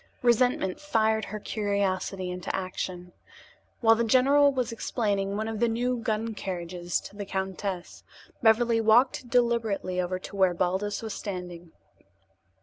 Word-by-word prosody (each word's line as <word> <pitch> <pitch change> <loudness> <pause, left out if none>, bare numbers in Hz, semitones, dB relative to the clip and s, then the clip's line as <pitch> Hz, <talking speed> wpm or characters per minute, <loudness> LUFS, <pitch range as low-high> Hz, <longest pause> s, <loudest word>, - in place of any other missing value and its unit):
Resentment 240 -5 +2
fired 220 -6 +1
her 215 +1 -6
curiosity 200 -3 -1
into 180 -1 -4
action. 185 -1 -5 0.7
While 225 -1 +6
the 230 +1 +1
general 275 +5 +5
was 250 -3 -2
explaining 205 -4 -1
one 215 +1 -2
of 220 -1 -4
the 235 - +3
new 245 +2 0
gun 225 0 -2
carriages 175 -3 -3
to - - -11
the 205 - -5
countess, 190 -1 -4 0.4
Beverly 230 0 +4
walked 240 +3 +3
deliberately 230 -7 +1
over 180 +1 -2
to 185 - -10
where 190 -2 +3
Baldos 190 +5 -1
was 220 - -4
standing. 180 -4 -6
210 Hz, 140 wpm, -27 LUFS, 185-230 Hz, 0.7 s, While